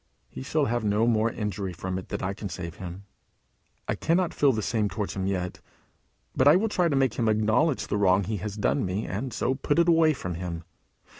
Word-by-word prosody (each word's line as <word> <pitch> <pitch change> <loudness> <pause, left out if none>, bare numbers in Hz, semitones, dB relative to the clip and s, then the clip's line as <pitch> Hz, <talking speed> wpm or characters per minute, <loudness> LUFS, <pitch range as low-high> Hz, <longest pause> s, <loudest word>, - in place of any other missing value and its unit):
He - - -8
shall 145 +2 0
have 120 -2 -1
no 105 +2 +2
more 115 -1 +2
injury 100 -3 -3
from 95 +2 -4
it 95 - -11
that - - -4
I 95 +1 -1
can 100 0 -6
save 85 -2 -6
him. 90 +1 -8 0.8
I - - +1
cannot 170 +2 +1
feel 140 -2 +4
the 110 -3 -2
same 110 -2 0
towards 105 0 -4
him 95 -1 -2
yet; 90 -2 -3 0.7
but 130 - +4
I 145 - +8
will 220 +4 +2
try 180 -4 +1
to 145 - 0
make 135 -4 +2
him 115 -2 +2
acknowledge 110 +8 +2
the - - -1
wrong 95 -1 +3
he 105 +3 -3
has 100 +2 -5
done 105 - +1
me, 95 +3 -2
and 115 +7 -4
so 130 - 0
put 145 +3 -1
it 170 0 +4
away 165 -2 +5
from 90 -10 -5
him. 85 -1 -5
105 Hz, 225 wpm, -27 LUFS, 95-135 Hz, 0.8 s, I